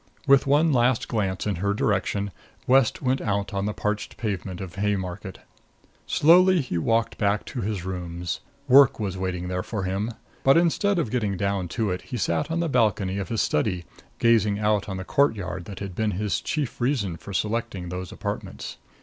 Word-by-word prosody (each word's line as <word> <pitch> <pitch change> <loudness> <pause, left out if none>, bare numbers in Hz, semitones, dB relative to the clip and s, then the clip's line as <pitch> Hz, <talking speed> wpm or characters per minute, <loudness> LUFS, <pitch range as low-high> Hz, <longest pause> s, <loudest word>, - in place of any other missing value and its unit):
With 140 -1 +5
one 150 +3 +4
last 120 -1 +2
glance 95 -5 -1
in 105 -4 -1
her 100 +3 0
direction, 100 -1 0 0.3
West 130 -1 +3
went 130 +1 +1
out 100 -1 -1
on 100 +1 -1
the - - 0
parched 105 0 -3
pavement 95 -4 -3
of 95 -3 -7
Haymarket. 95 -2 -2 0.7
Slowly 180 +4 +5
he 125 - -2
walked 115 +5 0
back 100 0 +1
to 125 - -5
his 100 -4 -3
rooms. 90 -2 -4 0.3
Work 135 -1 +7
was 100 -3 -2
waiting 90 -1 -3
there 90 0 -2
for 100 0 -4
him; 95 +4 -1 0.3
but 135 +3 +6
instead 175 +4 +2
of 150 -11 -1
getting 105 -6 0
down 100 -1 -1
to 110 -4 +1
it, 90 - -3
he 125 - -6
sat 100 - 0
on 165 +1 0
the 170 - 0
balcony 105 -7 +1
of 100 - -4
his 115 -2 +1
study, 90 +2 0 0.3
gazing 110 -3 +3
out 105 -1 +1
on 95 - -3
the 95 - -4
courtyard 100 -11 0
that 100 -2 -8
had 100 -2 -5
been 110 +4 0
his 105 0 -1
chief 145 -6 -3
reason 120 - 0
for 100 - -10
selecting 105 -3 -2
those 90 0 -5
apartments. - - -5
105 Hz, 185 wpm, -25 LUFS, 95-120 Hz, 0.7 s, Work